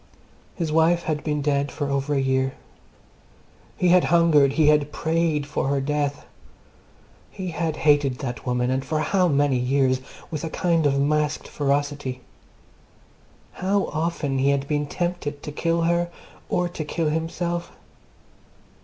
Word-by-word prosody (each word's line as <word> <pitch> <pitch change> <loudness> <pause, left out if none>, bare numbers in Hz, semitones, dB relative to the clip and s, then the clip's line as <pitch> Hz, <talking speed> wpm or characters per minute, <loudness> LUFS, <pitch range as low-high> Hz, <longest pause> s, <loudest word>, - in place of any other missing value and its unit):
His 165 -4 -2
wife 165 +2 +3
had 155 -2 -2
been 150 -2 -1
dead 140 -1 0
for 145 -2 -3
over 140 +1 0
a - - +2
year. 130 0 0 1.2
He 180 - +2
had 180 0 +5
hungered, 155 -5 +4
he 155 0 +3
had 150 -1 +3
prayed 160 -2 0
for 145 -1 -2
her 140 0 +1
death. 145 +1 -2 1.0
He 185 -2 -6
had 165 -2 -2
hated 145 -4 +3
that 120 -5 -5
woman 125 0 0
(and 130 +1 0
for 155 +3 -2
how 185 +2 +2
many 140 -4 +2
years!) 130 0 +1 0.3
with 155 -3 -4
a 165 - -2
kind 165 -3 +1
of 140 -1 +1
masked 150 +1 0
ferocity. 140 -2 -1 1.3
How 195 +2 0
often 155 -4 -1
he 135 +1 +3
had 140 0 0
been 145 -1 -1
tempted 175 -4 -3
to 150 - -5
kill 165 +2 0
her 170 +1 +1 0.4
or 180 0 +1
to 175 -2 -5
kill 155 +1 -1
himself! 170 +2 -2
150 Hz, 150 wpm, -24 LUFS, 140-165 Hz, 1.3 s, had